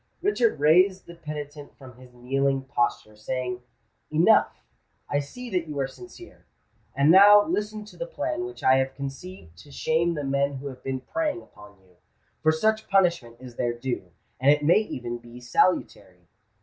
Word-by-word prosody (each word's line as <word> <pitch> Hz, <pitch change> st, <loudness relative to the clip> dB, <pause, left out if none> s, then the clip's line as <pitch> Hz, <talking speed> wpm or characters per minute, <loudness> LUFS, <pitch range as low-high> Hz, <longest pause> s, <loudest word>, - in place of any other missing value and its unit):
Richard 245 Hz, -, +1 dB
raised 180 Hz, +6 st, +4 dB
the 170 Hz, -, -11 dB
penitent 150 Hz, -3 st, -8 dB
from 130 Hz, -3 st, -13 dB
his 130 Hz, -1 st, -15 dB
kneeling 135 Hz, +2 st, -1 dB
posture, 120 Hz, -4 st, -2 dB
saying, 125 Hz, +3 st, -4 dB, 0.5 s
"Enough! -, -, +4 dB, 0.6 s
I 145 Hz, -, 0 dB
see 245 Hz, -, -8 dB
that 180 Hz, -3 st, -1 dB
you 150 Hz, -2 st, -5 dB
are 135 Hz, -, +1 dB
sincere. 355 Hz, -, -14 dB, 0.5 s
And 140 Hz, +3 st, +4 dB
now 205 Hz, +3 st, +8 dB
listen 215 Hz, -8 st, -3 dB
to 210 Hz, -, -15 dB
the -, -, -5 dB
plan 335 Hz, -8 st, -3 dB
which 370 Hz, 0 st, -8 dB
I 130 Hz, -, +5 dB
have 135 Hz, 0 st, -1 dB
conceived 140 Hz, -, -8 dB
to 145 Hz, -, -15 dB
shame 165 Hz, +4 st, 0 dB
the 145 Hz, -, -4 dB
men 140 Hz, +1 st, 0 dB
who 135 Hz, +1 st, -8 dB
have 130 Hz, -, -12 dB
been 130 Hz, -1 st, -3 dB
preying 320 Hz, -, -3 dB
upon 105 Hz, -1 st, -17 dB
you; 90 Hz, -2 st, -27 dB, 0.4 s
for 155 Hz, -, +4 dB
such 220 Hz, +7 st, 0 dB
punishment 170 Hz, -12 st, +1 dB
is 125 Hz, -2 st, -12 dB
their 120 Hz, -1 st, 0 dB
due—and 120 Hz, -, -3 dB
it 150 Hz, 0 st, +4 dB
may 170 Hz, +7 st, +5 dB
even 120 Hz, -, -5 dB
be 120 Hz, +1 st, -13 dB
salutary." 100 Hz, -, -1 dB
140 Hz, 170 wpm, -25 LUFS, 125-185 Hz, 0.6 s, now